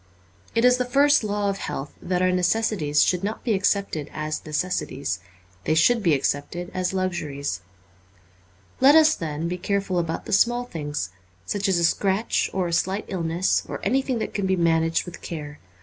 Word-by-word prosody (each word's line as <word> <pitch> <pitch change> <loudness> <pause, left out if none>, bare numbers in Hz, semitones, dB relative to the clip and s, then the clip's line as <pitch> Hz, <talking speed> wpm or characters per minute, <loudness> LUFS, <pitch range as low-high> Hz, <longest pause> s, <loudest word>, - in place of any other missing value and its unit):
It 230 +1 +3
is 250 0 +6
the 250 - +1
first 280 +1 +4
law 205 -1 -1
of 195 0 -1
health 135 +1 -5
that 180 0 0
our 185 - +3
necessities 180 -4 +2
should 180 0 +1
not 210 +2 -3
be 230 - +1
accepted 195 -6 0
as 155 0 -4
necessities; 150 - -2 0.5
they 155 - +2
should 230 +8 +4
be 170 -6 +3
accepted 145 +6 -2
as 185 -1 -1
luxuries. 150 - -3 1.2
Let 275 +3 +7
us, 315 -1 +7
then, 160 - -4
be 180 +1 -3
careful 195 -1 -1
about 165 -1 -3
the - - -4
small 240 +4 +3
things, 145 - -4 0.3
such 200 -1 -1
as 190 - +3
a 170 - +1
scratch 195 +5 +1
or 185 -2 -1
a 170 - -3
slight 190 +4 0
illness, 175 -1 0
or - - -4
anything 265 -1 +1
that 225 - -4
can 200 -2 -1
be 190 - +2
managed 165 -1 +2
with 175 -1 -9
care. 150 -3 -7
180 Hz, 180 wpm, -24 LUFS, 160-205 Hz, 1.2 s, Let